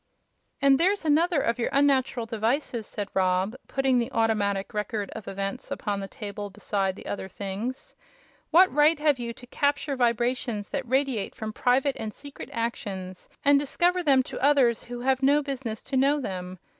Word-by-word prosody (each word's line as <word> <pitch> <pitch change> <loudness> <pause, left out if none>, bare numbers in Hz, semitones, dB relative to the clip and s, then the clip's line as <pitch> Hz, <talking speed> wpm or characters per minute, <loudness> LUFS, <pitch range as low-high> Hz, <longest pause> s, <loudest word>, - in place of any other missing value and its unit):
"And 275 -1 +6
there's 380 +1 +2
another 320 +2 +3
of 235 -2 0
your 235 - 0
unnatural 270 -4 +2
devices," 230 +1 -1
said 205 -1 -5
Rob, 185 +3 +1
putting 265 -2 +2
the 235 - -2
Automatic 205 -3 0
Record 210 -1 -3
of 210 - -8
Events 195 0 -4
upon 205 -1 -2
the 195 - -5
table 205 -3 -6
beside 195 0 -2
the - - -12
other 195 - -4
things. 205 +7 -5 0.6
"What 365 +4 +6
right 300 +2 +5
have 295 -3 +2
you 235 -1 -3
to 245 - -14
capture 285 +2 0
vibrations 240 -3 0
that 275 -4 -4
radiate 260 -5 0
from 220 -1 -5
private 260 +3 +2
and 220 -1 -4
secret 285 -1 -10
actions 195 -6 -4 0.2
and 285 0 +6
discover 350 +6 +1
them 275 -5 +4
to - - -7
others 265 -5 +4
who 240 0 -6
have 265 +1 +1
no 285 +2 +4
business 260 -6 -5
to 270 - -5
know 280 +3 +3
them? 185 -6 -5
245 Hz, 170 wpm, -26 LUFS, 210-280 Hz, 0.6 s, And